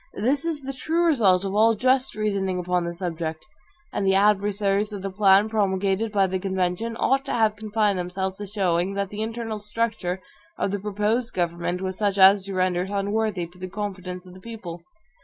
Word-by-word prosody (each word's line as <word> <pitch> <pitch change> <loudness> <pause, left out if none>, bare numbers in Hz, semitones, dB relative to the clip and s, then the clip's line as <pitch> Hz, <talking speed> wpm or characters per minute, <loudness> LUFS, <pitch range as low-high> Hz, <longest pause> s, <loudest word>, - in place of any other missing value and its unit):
This 270 +8 +1
is 320 -3 -2
the 275 +1 -4
true 325 +6 0
result 200 - +4
of 195 - -2
all 225 +2 +4
just 255 +3 +2
reasoning 200 -3 -1
upon 180 -1 0
the 170 - -3
subject. 165 -3 -4 0.5
And - - -1
the 190 0 +3
adversaries 205 0 +2
of 200 -2 -6
the 195 - -3
plan 195 +1 +5
promulgated 200 0 0
by 200 -2 +3
the 190 0 -2
convention 190 +4 -1
ought 270 +1 +2
to - - -4
have 220 -2 +2
confined 210 -2 0
themselves 190 +2 -3
to 205 - -5
showing, 190 -2 0
that 200 -1 -1
the 210 +1 -5
internal 225 -1 -3
structure 210 -3 -2 0.4
of 195 - -1
the 205 - -2
proposed 210 +4 -1
government 175 +1 -1
was 190 -1 -4
such 200 -2 +1
as 190 0 +7
to 195 -1 -5
render 185 -1 +1
it 185 - -4
unworthy 205 -1 -1
of 175 +2 -10
the 185 0 -6
confidence 185 -2 -5
of 180 - -13
the 185 - -13
people. 185 -6 -8
200 Hz, 195 wpm, -24 LUFS, 185-215 Hz, 0.5 s, as